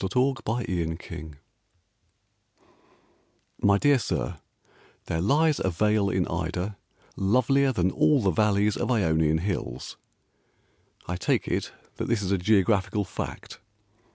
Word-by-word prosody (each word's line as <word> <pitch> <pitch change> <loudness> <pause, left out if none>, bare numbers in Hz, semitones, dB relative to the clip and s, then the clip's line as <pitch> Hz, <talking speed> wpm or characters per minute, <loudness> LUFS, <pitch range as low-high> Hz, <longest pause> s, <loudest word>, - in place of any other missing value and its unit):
TO 95 - 0 0.2
A 135 -3 -6
BOOKSELLER 85 -9 -4 2.3
My 100 -1 +4
dear 140 +4 +4
Sir, - - -3 0.7
"There 80 - -2
lies 150 - +3
a 95 - +1
vale 105 +3 +1
in 95 -2 0
Ida 90 +4 -3 0.4
Lovelier 130 +7 +2
Than 95 -6 +1
all 150 +2 +3
the 95 - +3
valleys 105 +3 +2
Of - - -2
Ionian 80 -9 +2
hills." 85 -8 -4 1.1
I 90 - -3
take 90 - 0
it - - -2 0.3
That - - -3
this 115 -3 0
is 95 - -2
a 100 - +2
geographical 100 +1 +2
fact. - - -7
100 Hz, 125 wpm, -26 LUFS, 90-115 Hz, 2.3 s, My